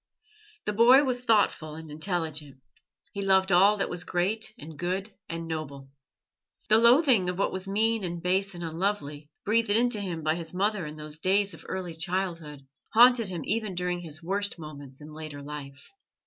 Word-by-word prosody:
The 210 Hz, -, -1 dB
boy 245 Hz, +6 st, +7 dB
was 250 Hz, -3 st, -1 dB
thoughtful 205 Hz, -9 st, +1 dB
and 160 Hz, -1 st, -10 dB
intelligent; 155 Hz, -4 st, -4 dB, 0.5 s
he 200 Hz, -, -4 dB
loved 190 Hz, -1 st, +3 dB
all 195 Hz, +4 st, +5 dB
that 195 Hz, -, 0 dB
was 175 Hz, 0 st, -3 dB
great 200 Hz, +6 st, -1 dB
and 155 Hz, +2 st, -10 dB
good 185 Hz, +6 st, -3 dB, 0.2 s
and 165 Hz, 0 st, -5 dB
noble. 140 Hz, -4 st, -6 dB, 0.8 s
The 215 Hz, +1 st, +6 dB
loathing 235 Hz, -, +5 dB
of 180 Hz, -, -3 dB
what 200 Hz, -, 0 dB
was 190 Hz, +1 st, -5 dB
mean 220 Hz, +2 st, +1 dB
and 175 Hz, -1 st, -3 dB
base 190 Hz, +2 st, 0 dB
and 175 Hz, -, -7 dB
unlovely, 160 Hz, -4 st, -3 dB, 0.2 s
breathed 225 Hz, +1 st, +2 dB
into 225 Hz, +1 st, +2 dB
him 170 Hz, -5 st, -4 dB
by 155 Hz, 0 st, +2 dB
his 165 Hz, +1 st, -6 dB
mother 200 Hz, -3 st, 0 dB
in 150 Hz, -, -8 dB
those 150 Hz, 0 st, -7 dB
days 195 Hz, +3 st, +2 dB
of -, -, -13 dB
early 180 Hz, -3 st, -4 dB
childhood, 165 Hz, -4 st, -4 dB, 0.3 s
haunted 240 Hz, -2 st, +6 dB
him 175 Hz, -4 st, -4 dB
even 215 Hz, -2 st, -1 dB
during 180 Hz, 0 st, -2 dB
his 160 Hz, -2 st, -7 dB
worst 200 Hz, +3 st, -1 dB
moments 145 Hz, -4 st, -10 dB
in 150 Hz, +1 st, -11 dB
later 155 Hz, -2 st, -8 dB
life. 140 Hz, -1 st, -9 dB
180 Hz, 175 wpm, -27 LUFS, 155-205 Hz, 0.8 s, boy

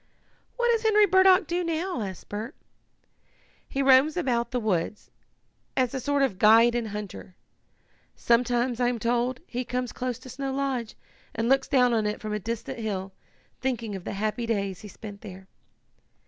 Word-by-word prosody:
"What 480 Hz, -1 st, +2 dB
does 460 Hz, -1 st, +1 dB
Henry 425 Hz, -2 st, +5 dB
Burdock 375 Hz, 0 st, +5 dB
do 350 Hz, +3 st, -1 dB
now?" 335 Hz, -3 st, -2 dB
asked 190 Hz, -3 st, -6 dB
Bert. 220 Hz, +7 st, -6 dB, 1.1 s
"He 275 Hz, -, -1 dB
roams 270 Hz, +4 st, +5 dB
about 240 Hz, -8 st, 0 dB
the 250 Hz, -, -1 dB
woods, 210 Hz, -2 st, -2 dB, 0.7 s
as 255 Hz, -2 st, +1 dB
a 265 Hz, -, -2 dB
sort 285 Hz, +1 st, +1 dB
of 200 Hz, -9 st, -1 dB
guide 230 Hz, +2 st, +6 dB
and 240 Hz, -2 st, -1 dB
hunter. 205 Hz, -3 st, -7 dB, 0.8 s
Sometimes, 240 Hz, +1 st, +1 dB
I 245 Hz, -, +2 dB
am 245 Hz, -1 st, 0 dB
told, 240 Hz, +2 st, 0 dB
he 250 Hz, -4 st, -4 dB
comes 250 Hz, 0 st, -3 dB
close 250 Hz, -2 st, -3 dB
to 255 Hz, -, -13 dB
Snow 270 Hz, +2 st, -4 dB
Lodge 265 Hz, -5 st, -2 dB, 0.4 s
and 225 Hz, +1 st, -1 dB
looks 270 Hz, +1 st, +3 dB
down 250 Hz, -3 st, +3 dB
on 220 Hz, -2 st, +1 dB
it 210 Hz, -, -3 dB
from 215 Hz, -1 st, -5 dB
a 210 Hz, -, -1 dB
distant 230 Hz, +3 st, -5 dB
hill, 195 Hz, -3 st, -4 dB, 0.5 s
thinking 235 Hz, -5 st, -2 dB
of 190 Hz, -, -7 dB
the -, -, -5 dB
happy 215 Hz, +3 st, -2 dB
days 200 Hz, -5 st, -2 dB
he 210 Hz, -, -9 dB
spent 205 Hz, 0 st, -10 dB
there." 190 Hz, -2 st, -10 dB
240 Hz, 175 wpm, -26 LUFS, 215-270 Hz, 1.1 s, guide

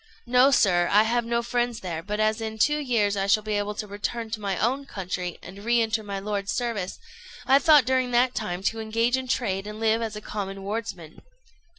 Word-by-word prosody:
"No, 250 Hz, +2 st, +5 dB
sir, 180 Hz, -9 st, +3 dB
I 210 Hz, +2 st, +6 dB
have 235 Hz, +1 st, 0 dB
no 235 Hz, 0 st, 0 dB
friends 240 Hz, -1 st, -1 dB
there; 170 Hz, -3 st, -4 dB
but 210 Hz, +4 st, -4 dB
as 215 Hz, +1 st, +1 dB
in 220 Hz, 0 st, -4 dB
two 295 Hz, +7 st, +2 dB
years 225 Hz, -8 st, +1 dB
I 195 Hz, 0 st, -1 dB
shall 210 Hz, +2 st, +3 dB
be 215 Hz, 0 st, -3 dB
able 205 Hz, 0 st, -1 dB
to 210 Hz, -, -4 dB
return 220 Hz, +3 st, -4 dB
to 220 Hz, -1 st, -4 dB
my 200 Hz, -1 st, -2 dB
own 265 Hz, +6 st, 0 dB
country, 180 Hz, -4 st, -4 dB
and 195 Hz, +3 st, -10 dB
re 235 Hz, +1 st, +3 dB
enter 225 Hz, -1 st, 0 dB
my 200 Hz, -2 st, -5 dB
lord's 200 Hz, 0 st, -3 dB
service, 225 Hz, -7 st, -2 dB, 0.5 s
I 270 Hz, +1 st, +5 dB
thought 300 Hz, -4 st, +6 dB
during 260 Hz, -1 st, +1 dB
that 245 Hz, +1 st, +3 dB
time 185 Hz, -4 st, -4 dB
to 225 Hz, +3 st, 0 dB
engage 230 Hz, +3 st, +1 dB
in 260 Hz, 0 st, -3 dB
trade 200 Hz, -6 st, -1 dB
and 210 Hz, +1 st, -7 dB
live 225 Hz, 0 st, +2 dB
as 220 Hz, -2 st, -3 dB
a -, -, -5 dB
common 195 Hz, -2 st, -5 dB
wardsman." 195 Hz, -6 st, -5 dB
220 Hz, 220 wpm, -25 LUFS, 200-240 Hz, 0.5 s, I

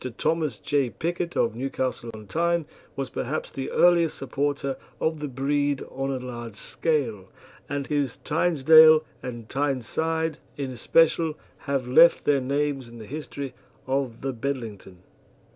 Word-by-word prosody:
Thomas 155 Hz, -7 st, 0 dB
J. 140 Hz, 0 st, 0 dB
Pickett, 175 Hz, +5 st, -3 dB
of 115 Hz, -, +2 dB
Newcastle 130 Hz, -1 st, -3 dB
on 110 Hz, -1 st, -10 dB
Tyne, 170 Hz, +5 st, 0 dB, 0.3 s
was 135 Hz, -3 st, -4 dB
perhaps 145 Hz, +5 st, -3 dB
the 135 Hz, -, -4 dB
earliest 170 Hz, -2 st, +4 dB
supporter 140 Hz, 0 st, -2 dB, 0.2 s
of 160 Hz, -1 st, 0 dB
the 150 Hz, -, -3 dB
breed 140 Hz, +1 st, 0 dB
on 135 Hz, +1 st, -3 dB
a 135 Hz, -, -1 dB
large 120 Hz, -3 st, -7 dB
scale, 115 Hz, -, -1 dB, 0.4 s
and 140 Hz, -1 st, -2 dB
his 145 Hz, -4 st, -1 dB
Tynedale 155 Hz, 0 st, +6 dB, 0.2 s
and 120 Hz, -3 st, -7 dB
Tyneside 145 Hz, +4 st, -1 dB, 0.2 s
in 135 Hz, -2 st, -3 dB
especial 160 Hz, +5 st, +2 dB, 0.3 s
have 135 Hz, -3 st, 0 dB
left 165 Hz, +7 st, +6 dB
their 140 Hz, -2 st, +3 dB
names 140 Hz, -1 st, -1 dB
in 120 Hz, -, -12 dB
the 110 Hz, -, -9 dB
history 140 Hz, 0 st, -6 dB, 0.3 s
of 130 Hz, -3 st, -2 dB
the 135 Hz, 0 st, -2 dB
Bedlington. 110 Hz, -8 st, -5 dB
140 Hz, 140 wpm, -26 LUFS, 125-155 Hz, 0.4 s, Tynedale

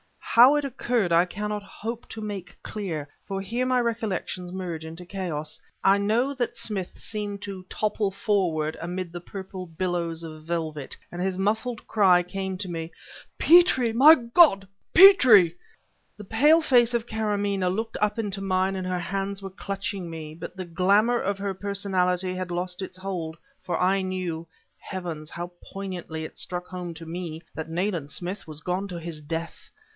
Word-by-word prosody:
How 250 Hz, +5 st, +6 dB
it 295 Hz, -, +1 dB
occurred 240 Hz, -7 st, 0 dB
I 170 Hz, +1 st, +5 dB
cannot 210 Hz, +3 st, -3 dB
hope 225 Hz, +3 st, -7 dB
to 220 Hz, -, -7 dB
make 205 Hz, -4 st, -6 dB
dear, 170 Hz, -9 st, -4 dB, 0.2 s
for 195 Hz, 0 st, -3 dB
here 235 Hz, +6 st, -1 dB
my 255 Hz, 0 st, +2 dB
recollections 210 Hz, -6 st, -2 dB
merge 175 Hz, -4 st, -5 dB
into 165 Hz, +2 st, -8 dB
a -, -, -14 dB
chaos. 170 Hz, -5 st, -4 dB, 0.2 s
I 195 Hz, +1 st, +6 dB
know 230 Hz, +7 st, +1 dB
that 250 Hz, -3 st, -2 dB
Smith 195 Hz, -5 st, -4 dB
seemed 205 Hz, -2 st, -4 dB
to 195 Hz, -2 st, -7 dB
topple 210 Hz, -1 st, 0 dB
forward 180 Hz, -6 st, 0 dB
amid 175 Hz, +1 st, -4 dB
the 175 Hz, -, -6 dB
purple 190 Hz, +1 st, -7 dB
billows 170 Hz, -1 st, -2 dB
of 155 Hz, -1 st, -9 dB
velvet, 160 Hz, -4 st, -3 dB, 0.2 s
and 175 Hz, -, -5 dB
his 185 Hz, 0 st, -1 dB
muffled 220 Hz, +4 st, -1 dB
cry 190 Hz, -5 st, +4 dB
came 190 Hz, +1 st, -4 dB
to 190 Hz, -2 st, -4 dB
me: 165 Hz, -1 st, -4 dB, 0.5 s
"Petrie! 320 Hz, -8 st, +6 dB
My 280 Hz, +8 st, +9 dB
God, 235 Hz, -, +5 dB, 0.3 s
Petrie!"... 250 Hz, -, +8 dB, 0.6 s
The 210 Hz, -, -8 dB
pale 295 Hz, +11 st, +5 dB
face 245 Hz, -5 st, +4 dB
of 235 Hz, -1 st, 0 dB
Karamaneh 205 Hz, -4 st, 0 dB
looked 225 Hz, +5 st, -2 dB
up 210 Hz, +2 st, +1 dB
into 205 Hz, -3 st, -3 dB
mine 190 Hz, 0 st, +1 dB
and 185 Hz, -1 st, -3 dB
her 180 Hz, -1 st, -1 dB
hands 195 Hz, +2 st, -3 dB
were 195 Hz, -, -6 dB
clutching 195 Hz, -1 st, -4 dB
me, 160 Hz, -2 st, -7 dB
but 170 Hz, -, -8 dB
the 185 Hz, -1 st, -5 dB
glamour 200 Hz, +8 st, +3 dB
of 200 Hz, 0 st, -1 dB
her 200 Hz, -1 st, -2 dB
personality 185 Hz, -2 st, 0 dB
had 185 Hz, -1 st, -4 dB
lost 180 Hz, +1 st, -2 dB
its 185 Hz, -1 st, -6 dB
hold, 180 Hz, -4 st, -4 dB, 0.2 s
for 175 Hz, -, -2 dB
I 190 Hz, +2 st, +3 dB
knew 180 Hz, -3 st, -3 dB, 0.3 s
heavens, 170 Hz, -5 st, -6 dB
how 175 Hz, +1 st, -6 dB
poignantly 180 Hz, -5 st, -6 dB
it 155 Hz, -, -8 dB
struck 180 Hz, 0 st, -4 dB
home 180 Hz, -2 st, -6 dB
to 165 Hz, -, -9 dB
me! 165 Hz, -1 st, -5 dB
that 160 Hz, 0 st, -5 dB
Nayland 170 Hz, -3 st, -1 dB
Smith 180 Hz, +5 st, -4 dB
was 155 Hz, -1 st, -7 dB
gone 180 Hz, +4 st, -2 dB
to 175 Hz, -3 st, -6 dB
his 165 Hz, -2 st, -5 dB
death. 165 Hz, +2 st, -5 dB
190 Hz, 170 wpm, -26 LUFS, 175-210 Hz, 0.6 s, My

